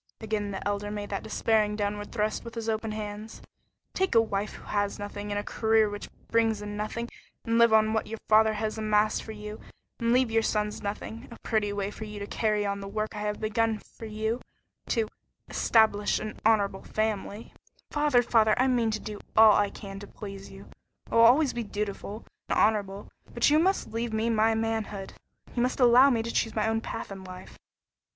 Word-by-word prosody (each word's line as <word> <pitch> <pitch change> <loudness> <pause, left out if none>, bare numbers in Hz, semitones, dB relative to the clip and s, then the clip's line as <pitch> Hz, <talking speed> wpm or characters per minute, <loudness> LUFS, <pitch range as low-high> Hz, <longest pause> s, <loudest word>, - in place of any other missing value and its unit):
Again 215 -2 -2
the 195 0 -4
Elder 205 0 -2
made 205 -1 -5
that 195 - -2
despairing 215 -2 +1
downward 205 0 -3
thrust 215 -2 -1
with 235 0 -9
his 230 -1 -4
open 220 0 -1
hands. 215 +1 -6 0.5
"Take 380 -8 0
a - - +8
wife 205 -2 -2
who - - -11
has 205 -1 -1
nothing, 205 0 -6
and 205 - -1
a 205 - -1
career 220 -1 +2
which 205 - -7 0.2
brings 225 -2 +2
in 205 0 -6
nothing, 215 +3 -3 0.4
and 230 0 +2
live 235 -1 +6
on 220 0 +4
what 220 - 0
your 225 +1 -5
father 220 0 +5
has 215 +1 -3
amassed 215 0 +2
for 220 - -8
you, 210 0 -8 0.4
and 235 0 +1
leave 250 -1 +3
your 225 0 +3
sons 210 -1 -1
nothing 210 +2 -5
a 235 - -11
pretty 215 -3 0
way 200 0 -2
for 220 - -7
you 210 0 -8
to 200 - -4
carry 210 0 0
on 200 0 -2
the 195 - -7
work 215 +2 -3
I - - -4
have 210 0 -2
begun 220 0 +1
for 225 - -11
you 220 +3 -2 0.5
to 225 -3 +1 0.4
establish 215 -2 +3
an 215 - -6
honorable 205 -3 +2
family 215 0 -3 0.2
" - - -36
"Father, 295 -5 +3
father, 220 -2 +4
I 255 - +3
mean 240 -3 +2
to 215 -1 -1
do 210 -1 -7 0.2
all 220 -1 +9
I 205 0 +3
can 195 -1 -9
to 205 - -9
please 195 -2 -9
you. 195 0 -11 0.5
I'll 230 - +3
be 230 - +9
always 275 +3 +4
dutiful 210 -1 -4 0.2
and - - +1
honorable 205 -2 +1 0.2
but 235 +4 +2
you 305 - +5
must 375 - +1
leave 230 0 -2
me 220 +1 +1
my 225 0 +3
manhood. 220 -3 -3 0.4
You 240 - 0
must 250 +2 0
allow 250 +2 +7
me 230 -4 +1
to 230 - -4
choose 225 - 0
my 215 0 +1
own 225 0 0
path 225 -2 -6
in 195 -1 -8
life." 185 0 -10
215 Hz, 205 wpm, -28 LUFS, 205-225 Hz, 0.5 s, all